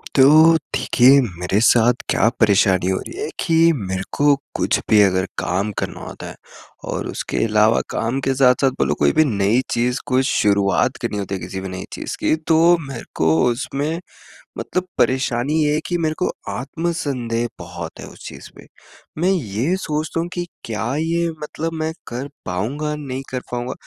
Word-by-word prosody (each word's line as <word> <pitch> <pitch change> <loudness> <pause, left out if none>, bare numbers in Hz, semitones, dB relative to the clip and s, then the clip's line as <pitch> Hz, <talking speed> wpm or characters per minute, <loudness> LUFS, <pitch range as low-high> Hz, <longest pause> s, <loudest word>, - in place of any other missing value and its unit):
तो, 155 +4 +7 0.2
देखिए, 130 +1 +5 0.2
मेरे 90 +3 0
साथ 120 +1 +5 0.2
क्या - - +3
परेशानी 95 -4 +3
हो 95 - +1
रही 370 +4 -8
है 440 - -3
कि 165 - +1 0.3
मेरे 95 0 -2
को 145 0 +5 0.2
कुछ - - +1
भी 105 -1 +6
अगर 95 -2 +3
काम 100 +4 -1
करना - - -4
होता - - -8
है - - -10 0.5
और - - -3
उसके - - -2
अलावा 110 +1 +3
काम 120 +4 -1
के 135 - 0
साथ-साथ 130 0 +4
बोलो - - +2
कोई - - +4
भी 155 - +5
नई 105 -1 +2
चीज़ 125 +2 0
कोई 130 -1 +2
शुरुआत 100 0 +2
करनी 115 -4 -2
होती 100 -1 -3
है 95 - -6
किसी 95 +2 -5
भी 95 - -5
नई 95 0 -6
चीज़ - - -5
की, - - +2
तो 165 +2 +4
मेरे 135 -4 -7
को 80 0 +2 0.2
उसमें 145 +7 -3 0.6
मतलब 185 0 -3
परेशानी 130 +1 +1
ये 150 0 +2
है 150 - +1
कि 175 - 0
मेरे 160 -2 -1
को 180 - +1 0.2
आत्म-संदेह 135 -5 -2
बहुत 85 -2 -8
है - - -7
उस - - -11
चीज़ - - -10
पे। - - -14 0.6
मैं 180 - +3
ये 135 - -1
सोचता 155 -2 -3
हूँ 170 - -1
कि 175 -1 -3 0.2
क्या 110 -2 -3
ये 170 +1 0
मतलब 160 +2 -4
मैं 160 0 -2 0.2
कर 125 +4 -5 0.2
पाऊँगा, 135 +12 -2
नहीं 135 -3 -5
कर 130 - -2
पाऊँगा? 120 0 -3
130 Hz, 180 wpm, -20 LUFS, 105-155 Hz, 0.6 s, तो